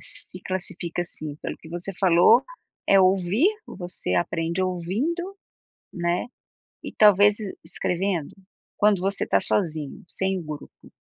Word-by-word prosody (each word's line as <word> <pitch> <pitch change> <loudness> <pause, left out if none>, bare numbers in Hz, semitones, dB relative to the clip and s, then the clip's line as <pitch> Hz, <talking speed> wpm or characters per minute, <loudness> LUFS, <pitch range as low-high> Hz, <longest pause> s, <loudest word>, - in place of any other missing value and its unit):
se - - -11
classifica, 175 -2 -3
assim, 155 -3 -6
pelo - - -3
que - - -13
você 175 +4 -4
falou 190 +6 +6 0.5
é 195 - +7
ouvir, 190 - +3 0.2
você 180 -1 -4
aprende 170 +1 0
ouvindo, 240 - -2 0.6
né, 175 +3 -1 0.6
e - - -6
talvez 205 0 +5
e 200 -3 -6
escrevendo, 175 -1 -2 0.4
quando 205 -3 +3
você 195 +2 -1
tá - - +3
sozinho, 155 -7 -1
sem 190 -2 -1
grupo? 150 -1 -10
185 Hz, 125 wpm, -24 LUFS, 170-200 Hz, 0.6 s, é